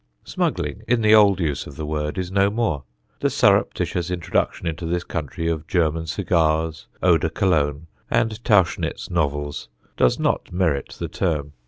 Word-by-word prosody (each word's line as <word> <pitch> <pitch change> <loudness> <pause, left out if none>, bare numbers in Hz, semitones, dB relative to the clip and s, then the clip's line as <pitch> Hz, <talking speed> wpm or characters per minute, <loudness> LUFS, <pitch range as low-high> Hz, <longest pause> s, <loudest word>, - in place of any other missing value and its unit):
Smuggling, - - -2
in 120 -1 +2
the 110 0 +5
old 100 -3 +6
use 75 -6 -2
of 70 - -11
the 80 - -5
word, 75 +1 -3
is 90 -1 -3
no 100 +1 +3
more. 105 - -1 0.4
The - - +1
surreptitious 90 0 +1
introduction 90 0 -1
into 80 +1 -3
this 90 +1 -1
country 80 +1 -4
of 80 -2 -2
German 80 -2 0
cigars, 80 -1 0 0.2
eau 90 -2 +5
de 80 - -1
Cologne, 80 -5 0 0.2
and 110 0 0
Tauchnitz 105 -8 +1
novels, 75 -5 -2 0.3
does 60 - +3
not - - -1
merit 85 -7 -1
the - - -3
term. 75 -5 -2
85 Hz, 160 wpm, -22 LUFS, 75-95 Hz, 0.4 s, old